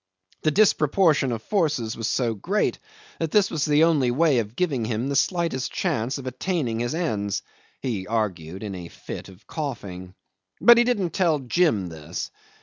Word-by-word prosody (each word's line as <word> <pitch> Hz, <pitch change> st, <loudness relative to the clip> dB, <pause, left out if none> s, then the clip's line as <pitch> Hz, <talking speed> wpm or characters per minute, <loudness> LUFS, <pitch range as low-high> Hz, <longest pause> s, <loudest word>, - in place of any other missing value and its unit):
The 155 Hz, -, +3 dB
disproportion 155 Hz, -5 st, +3 dB
of 115 Hz, -1 st, -4 dB
forces 150 Hz, -, 0 dB
was 115 Hz, -2 st, -3 dB
so 120 Hz, -1 st, +1 dB
great 190 Hz, -, -1 dB, 0.4 s
that 165 Hz, -, -1 dB
this 200 Hz, +3 st, +3 dB
was 150 Hz, -3 st, 0 dB
the 150 Hz, +1 st, +4 dB
only 150 Hz, -7 st, +3 dB
way 135 Hz, -2 st, +3 dB
giving 125 Hz, -, -1 dB
him 115 Hz, +3 st, -2 dB
the 140 Hz, -, -1 dB
slightest 165 Hz, -4 st, 0 dB
chance 115 Hz, +6 st, -1 dB
of 135 Hz, -, -8 dB
attaining 130 Hz, -2 st, -2 dB
his 120 Hz, +5 st, -1 dB
ends 105 Hz, -, -1 dB, 0.4 s
he 105 Hz, -8 st, -2 dB
argued 95 Hz, -5 st, -2 dB
in 105 Hz, -2 st, -4 dB
a 90 Hz, -2 st, -7 dB
fit -, -, -8 dB
of 95 Hz, +2 st, -17 dB
coughing. 95 Hz, -, -6 dB, 0.4 s
But 235 Hz, 0 st, +8 dB
he -, -, +6 dB
didn't 205 Hz, -9 st, 0 dB
tell 170 Hz, -5 st, +2 dB
Jim 130 Hz, -, +1 dB
this. 80 Hz, -2 st, -6 dB
130 Hz, 165 wpm, -24 LUFS, 110-165 Hz, 0.4 s, But